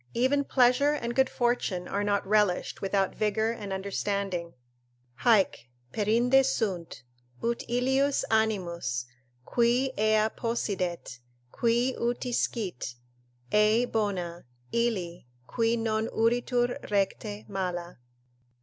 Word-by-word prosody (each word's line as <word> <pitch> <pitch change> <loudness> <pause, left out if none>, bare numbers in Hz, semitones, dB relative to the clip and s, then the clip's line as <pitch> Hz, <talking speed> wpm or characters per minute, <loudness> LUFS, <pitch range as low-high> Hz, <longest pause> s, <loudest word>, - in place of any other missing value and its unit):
even 260 +4 +2
pleasure 265 +2 +3
and 235 -5 -3
good 265 +1 +3
fortune 240 -7 -1
are 200 +1 -1
not 205 0 0
relished 205 -3 +1
without 195 -1 0
vigour 220 +1 0
and 210 -4 -6
understanding: 190 -2 -2 0.6
"Haec 200 - +2 0.2
perinde 240 +5 +3
sunt, 190 - -2 0.4
ut 235 0 0
ilius 265 +3 +2
animus; 175 - 0 0.4
qui 245 +2 +2
ea 215 0 +3
possidet 185 - -3 0.3
Qui 240 +2 +1
uti 240 +1 -1
scit, 190 - -2 0.6
ei 215 +3 +4
bona; 190 -7 -2 0.3
illi, 185 - -1 0.2
qui 230 - 0
non 220 -1 0
uritur 245 +2 +1
recte, 205 +1 -1
mala." 180 -5 -4
215 Hz, 105 wpm, -28 LUFS, 190-240 Hz, 0.6 s, ei